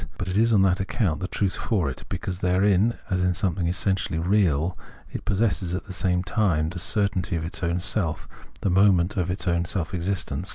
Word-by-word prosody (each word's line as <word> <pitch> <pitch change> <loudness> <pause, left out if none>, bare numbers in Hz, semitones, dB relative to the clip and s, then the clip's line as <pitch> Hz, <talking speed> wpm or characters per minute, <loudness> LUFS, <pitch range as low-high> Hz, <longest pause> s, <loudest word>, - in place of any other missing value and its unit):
But 90 - -4
it 90 - -2
is 115 +3 +3
on 100 -3 +5
that 90 -1 +2
accotmt 95 - -1
the 90 - -3
truth 95 -1 -1
for 95 -10 0
it, 65 - -6
because 95 -1 -4
therein, 95 +4 +3 0.2
as 90 0 +1
in 90 -1 +1
something 90 -1 -1
essentially 95 -1 0
real, 85 -2 +2 0.4
it - - -6
possesses 95 -4 0
at 95 - -5
the 100 - -8
same 90 -1 0
time 90 -7 +1
the 90 +1 -5
certainty 100 -2 0
of 80 -1 -2
its 85 - -5
own 85 0 0
self, 90 -3 -1 0.3
the 95 - +1
moment 95 -1 +4
of 90 -3 -1
its 90 +1 -2
own 85 -1 +2
self 90 -1 -3
existence. 90 +1 -2
90 Hz, 205 wpm, -25 LUFS, 85-100 Hz, 0.4 s, on